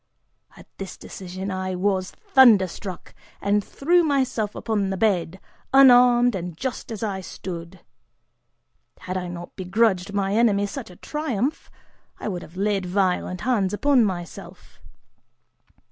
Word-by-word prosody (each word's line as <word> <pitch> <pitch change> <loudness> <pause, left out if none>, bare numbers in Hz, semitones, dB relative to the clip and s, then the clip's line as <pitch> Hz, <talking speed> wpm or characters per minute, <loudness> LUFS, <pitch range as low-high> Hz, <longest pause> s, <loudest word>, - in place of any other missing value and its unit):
At - - -14
this 195 -1 -7
decision 190 +1 -7
I 185 0 -3
was 185 0 0
thunder 235 -8 +5
struck, 185 0 -8 0.3
and 205 +1 +1
threw 345 - +2
myself 260 -8 0
upon 205 -4 -1
the 190 - -2
bed, 190 -4 0 0.3
unarmed 245 -2 +6
and 180 -3 -5
just 255 +2 -5
as 220 -1 -5
I 195 -3 -2
stood. 175 -1 -8 1.2
Had 185 - -5
I 180 -1 -3
not 175 0 -8
begrudged 195 0 +1
my 200 -1 -1
enemy 210 -3 +3
such 230 +3 -7
a 180 - -13
triumph, 290 - -3 0.5
I - - -5
would 180 -3 -4
have 170 +2 -13
laid 200 -1 0
violent 185 -1 0
hands 210 -5 0
upon 275 +1 +3
myself. 175 -4 -6
200 Hz, 135 wpm, -23 LUFS, 185-235 Hz, 1.2 s, unarmed